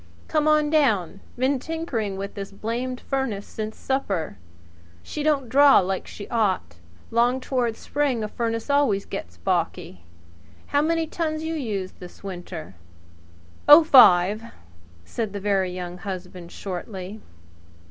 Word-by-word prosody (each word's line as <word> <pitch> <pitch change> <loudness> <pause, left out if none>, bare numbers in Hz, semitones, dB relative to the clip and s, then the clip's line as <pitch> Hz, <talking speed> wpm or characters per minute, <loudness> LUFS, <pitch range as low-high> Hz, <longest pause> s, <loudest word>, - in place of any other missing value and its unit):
"Come 305 -1 +1
on 305 -1 +3
down! 215 - +2 0.2
Been 260 +2 +1
tinkering 245 - -3
with 200 +1 -5
this 195 0 -6
blamed 240 +5 -3
furnace 265 -7 -2
since 215 0 -6
supper. 195 - -2 0.6
She 300 - -5
don't 290 -4 +1
draw 280 +3 +6
like 190 0 0
she 205 - -9
ought. 190 - 0 0.3
'Long 240 +3 +2
toward 250 -3 -1
spring 280 -6 -1
a - - -2
furnace 230 0 -3
always 280 -9 +2
gets 85 0 -7
balky. 85 +1 -2 0.6
How 285 - +1
many 330 +1 +1
tons 315 -1 -3
you 320 0 -2
used 210 -11 -4
this 180 +1 -12
winter?" 175 - -7 1.0
"Oh 300 +3 +11
ten," 215 - +6 0.5
said 215 - -4
the 200 - -4
Very 195 -2 +1
Young 180 0 -6
Husband 180 -2 -7
shortly. 190 +2 -6
220 Hz, 135 wpm, -24 LUFS, 190-275 Hz, 1.0 s, Oh